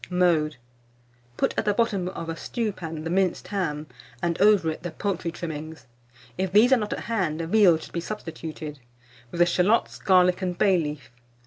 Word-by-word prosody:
Mode. 170 -4 +2 0.8
Put - - +1
at - - -2
the 205 -1 +2
bottom 200 -6 +1
of 165 -3 -7
a 165 - -3
stewpan 170 -7 -4
the 165 - -3
minced 185 -1 0
ham, 155 -7 -2 0.3
and 170 -1 0
over 200 -6 +5
it 155 - -8
the 175 - -4
poultry 185 -1 -3
trimmings 160 -1 -7 0.5
(if 190 -1 -1
these 225 +6 +6
are - - +6
not 210 -2 -2
at - - -5
hand, 185 -9 -1
veal 175 0 +4
should 160 - -12
be 170 - -2
substituted), 160 -6 -7 0.5
with 170 - -7
the 175 - +6
shalots, 185 +6 +1
garlic, 180 -1 +4
and 180 -1 -2
bay 190 -2 +4
leaf. 150 -5 -5
175 Hz, 180 wpm, -25 LUFS, 160-200 Hz, 0.8 s, these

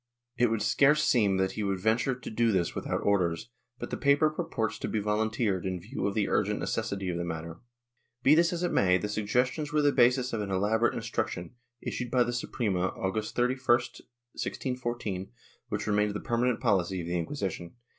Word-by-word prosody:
It 120 -1 +3
would 110 -2 0
scarce 145 +7 +4
seem 105 -6 +3
that 95 0 +1
he 105 - -4
would 100 -2 -1
venture 115 +6 +1
to 125 - -8
do 115 +1 +2
this 90 -4 0
without - - -3
orders, 95 +1 +1 0.3
but - - -7
the - - -2
paper 145 +2 +3
purports 155 - -2
to - - -3
be 110 - -1
volunteered 105 -2 0
in 95 -1 -2
view 105 +5 -3
of 100 - -3
the 105 -2 +1
urgent - - +1
necessity 95 -2 -2
of 85 - -2
the 85 - -2
matter. 85 0 -5 0.6
Be 140 - +6
this 170 +3 +4
as 175 0 -3
it 175 - 0
may, 90 -1 +4
the 95 - -3
suggestions 125 +8 0
were 150 0 +2
the 145 - +5
basis 125 0 +3
of 110 - -1
an 100 - -4
elaborate 105 +5 +1
instruction, 90 +6 -3 0.3
issued 125 -1 -3
by 125 0 +3
the 120 0 -3
Suprema 105 -6 -1
August 105 +3 -2
31, 125 +2 +1
1614, 120 -3 -2 0.4
which - - -2
remained 105 -1 +1
the - - -2
permanent 120 -1 0
policy 95 -1 +1
of - - -6
the 85 +1 -2
Inquisition. 90 - -4
110 Hz, 195 wpm, -29 LUFS, 95-125 Hz, 0.6 s, Be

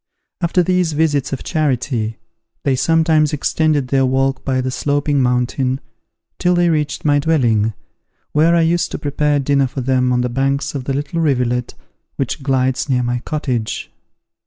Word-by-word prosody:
After 175 +1 +2
these 180 -2 +1
visits 145 -3 +1
of 135 - -4
charity, 125 -7 -1 0.5
they 135 -2 +2
sometimes 160 +1 +2
extended 150 -2 0
their 135 0 +2
walk 135 +1 0
by 130 -1 0
the 130 0 -1
Sloping 145 +1 0
Mountain, 125 +1 0 0.6
till 180 0 +2
they 175 0 +3
reached 150 -1 -2
my 145 -1 +4
dwelling, 115 -9 +1 0.6
where 160 +3 +3
I 170 - +4
used 170 +2 +1
to - - -2
prepare 145 0 0
dinner 140 -1 +2
for 130 +1 -5
them 130 0 +1
on 125 0 +2
the 125 - 0
banks 135 +3 -1
of 135 -3 -5
the 135 - -1
little 145 +4 -2
rivulet 125 -5 0 0.4
which 135 +2 -3
glides 130 0 0
near 125 -2 +2
my 120 0 -1
cottage. 125 -5 -3
140 Hz, 160 wpm, -18 LUFS, 125-155 Hz, 0.6 s, my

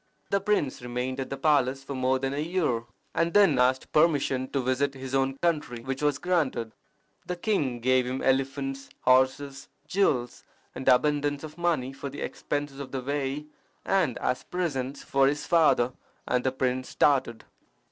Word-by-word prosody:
The 200 0 +2
prince 195 -12 0
remained 125 +2 -3
at 135 - -3
the 135 - -4
palace 135 -2 +2
for 140 - -6
more 130 0 +1
than 135 +1 -2
a 140 - -2
year, 155 -8 0 0.3
and 165 +2 0
then 195 -10 +5
asked 130 +1 +2
permission 140 -5 +2
to 140 - -1
visit 130 +2 0
his 130 0 -7
own 135 0 +1
country, 150 -8 0
which 135 +2 -4
was 145 -2 +2
granted. 150 -11 0 0.6
The 180 - -2
king 165 - -1
gave 130 0 +3
him 130 +1 -3
elephants, 135 +1 -1
horses, 130 +2 +2 0.2
jewels, 130 -11 0 0.3
and - - -7
abundance 145 +2 +2
of 155 -1 -8
money 160 -7 0
for 140 +1 -6
the 140 - -8
expenses 145 -1 -4
of 140 - -7
the 135 - -3
way 140 +1 -2 0.4
and 180 -10 +1
as 125 - -1
presents 140 -7 -3
for 135 0 +3
his 145 +1 -1
father, 150 -7 +3 0.3
and 125 0 +1
the 130 - +1
prince 130 0 -1
started. 130 -5 +1
135 Hz, 165 wpm, -27 LUFS, 130-150 Hz, 0.6 s, then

